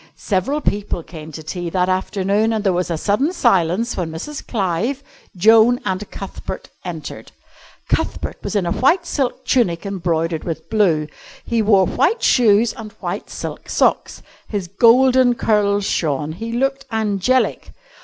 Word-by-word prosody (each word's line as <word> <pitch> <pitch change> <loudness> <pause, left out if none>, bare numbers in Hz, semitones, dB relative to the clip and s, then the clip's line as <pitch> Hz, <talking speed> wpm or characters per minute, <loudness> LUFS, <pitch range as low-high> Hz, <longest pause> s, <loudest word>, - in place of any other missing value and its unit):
Several 220 +10 -1
people 205 - -2
came 160 -1 -10
to 155 +1 -8
tea 175 +2 -4
that 180 +1 +1
afternoon, 195 +3 0
and 215 -2 -1
there 195 -3 +2
was 180 0 -1
a 165 - -1
sudden 210 - +1
silence 225 - +1
when 175 -3 -2
Mrs. 220 - -6
Clive, 220 +6 -1 0.3
Joan, 225 +5 +5
and 190 +1 -3
Cuthbert 195 - -7
entered. 170 -4 -7 0.6
Cuthbert - - -2
was - - -4
in 200 -3 +1
a 170 - -1
white 340 - +2
silk 260 -4 -2
tunic 185 -11 +1
embroidered 170 -4 -1
with 160 +2 -6
blue, 175 -9 +2 0.4
he 230 -1 0
wore 200 -3 +4
white 375 - +1
shoes 220 -1 +4
and 215 -1 -9
white - - -5
silk - - -7
socks. - - 0 0.2
His 200 -4 -3
golden 245 +5 +4
curls 205 -3 +1
shone. 150 -3 -1
He 225 +8 -6
looked 270 +3 -1
angelic. 220 +3 0
205 Hz, 150 wpm, -19 LUFS, 175-235 Hz, 0.6 s, Joan